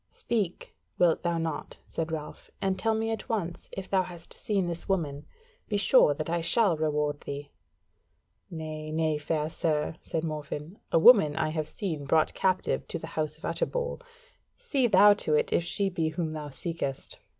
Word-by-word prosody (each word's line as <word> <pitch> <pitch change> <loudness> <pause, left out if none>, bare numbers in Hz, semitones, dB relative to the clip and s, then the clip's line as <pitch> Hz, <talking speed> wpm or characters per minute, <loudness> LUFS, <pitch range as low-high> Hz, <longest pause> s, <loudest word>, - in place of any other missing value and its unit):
"Speak, 205 -7 -2 0.2
wilt 175 -2 +3
thou 170 -1 0
not," 165 -2 -4
said 165 0 -4
Ralph, 155 -2 -6
"and 190 -1 0
tell 225 -1 +1
me 225 +1 -1
at 225 - -5
once 180 -7 -3
if 190 - -6
thou 190 -1 +3
hast 175 -2 -7
seen 200 -4 -1
this 170 +1 -5
woman? 150 -6 -1 0.4
Be 205 - +1
sure 200 - +5
that 155 - -4
I 170 +1 0
shall 195 +2 +3
reward 150 -1 0
thee." 140 0 -6 1.0
"Nay, 155 -2 -6
nay, 155 -1 0
fair 150 0 -1
sir," 155 -1 -1
said 160 - -3
Morfinn; 155 +3 -5
"a - - +4
woman 165 -5 +7
I 160 - 0
have 155 -1 -2
seen 160 -9 -4
brought 155 +2 +3
captive 185 -1 0
to - - -3
the - - -7
House 155 -1 -2
of - - -9
Utterbol. - - -2 0.6
See 290 - +1
thou 205 0 +7
to 155 -7 +1
it - - +1
if - - +3 0.2
it 195 -2 +1
be 160 -2 0
she 155 - -10
whom 165 -3 -2
thou 150 -1 -5
seekest." 140 -2 -4
165 Hz, 185 wpm, -28 LUFS, 155-195 Hz, 1.0 s, woman